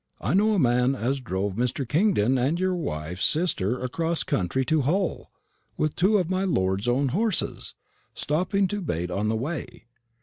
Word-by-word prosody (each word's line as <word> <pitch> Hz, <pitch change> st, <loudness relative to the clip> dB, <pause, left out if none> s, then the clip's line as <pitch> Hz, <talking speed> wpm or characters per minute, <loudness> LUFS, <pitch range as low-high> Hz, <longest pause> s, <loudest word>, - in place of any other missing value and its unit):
I -, -, -1 dB
know 210 Hz, +3 st, +3 dB
a -, -, +1 dB
man 125 Hz, -2 st, +3 dB
as 135 Hz, +2 st, -1 dB
drove 100 Hz, -4 st, -2 dB
Mr. 125 Hz, +4 st, -1 dB
Kingdon 145 Hz, -, +2 dB
and 145 Hz, +8 st, +1 dB
your 185 Hz, 0 st, +1 dB
wife's 90 Hz, -, -3 dB
sister 125 Hz, -, +1 dB
across 165 Hz, +6 st, -1 dB
country 115 Hz, +9 st, -1 dB
to 155 Hz, +2 st, +2 dB
Hull 175 Hz, +8 st, -1 dB, 0.5 s
with 155 Hz, -1 st, 0 dB
two 200 Hz, +4 st, +3 dB
of 180 Hz, -4 st, 0 dB
my 185 Hz, +1 st, 0 dB
lord's 95 Hz, -, 0 dB
own 130 Hz, +3 st, +2 dB
horses, 210 Hz, -, -1 dB, 0.4 s
stopping 185 Hz, +6 st, 0 dB
to 205 Hz, 0 st, -3 dB
bait 90 Hz, -, -3 dB
on 105 Hz, +4 st, -1 dB
the 110 Hz, -, +1 dB
way. 130 Hz, 0 st, -5 dB
135 Hz, 170 wpm, -25 LUFS, 115-180 Hz, 0.5 s, know